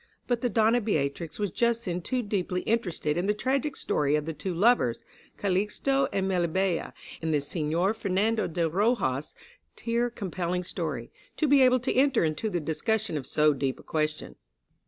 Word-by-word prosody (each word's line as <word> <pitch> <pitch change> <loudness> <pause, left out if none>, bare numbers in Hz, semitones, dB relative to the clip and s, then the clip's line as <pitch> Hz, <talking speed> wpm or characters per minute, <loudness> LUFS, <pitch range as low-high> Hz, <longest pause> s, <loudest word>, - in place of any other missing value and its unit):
But 245 -2 0
the 245 - +1
Donna 225 +2 +3
Beatrix 155 -5 -2
was 205 -3 -1
just 235 +2 +1
then 180 -1 -2
too 250 +7 -1
deeply 185 -3 -1
interested 175 -9 -1
in 180 +3 0
the 210 - +2
tragic 270 +6 -1
story 145 0 +1
of 150 -1 -1
the 160 - -3
two 185 +4 -4
lovers, 175 - +2 0.3
Calixto 210 +8 +1
and 190 -1 0
Melibea, 180 -1 0 0.3
in 160 - -2
the 150 -2 +2
Senor 165 +6 0
Fernando 215 +1 0
de 170 0 0
Rojas' 170 - 0 0.4
tear 235 +1 0
compelling 180 -5 -3
story, 155 -9 -4 0.3
to 310 - +2
be 280 -1 +5
able 255 0 +5
to 250 - 0
enter 265 -3 +3
into 160 +8 -1
the 180 - -1
discussion 195 +6 -1
of 140 -4 -3
so 150 -1 +3
deep 135 -1 -2
a - - -13
question. 155 -1 -2
190 Hz, 175 wpm, -28 LUFS, 160-230 Hz, 0.4 s, be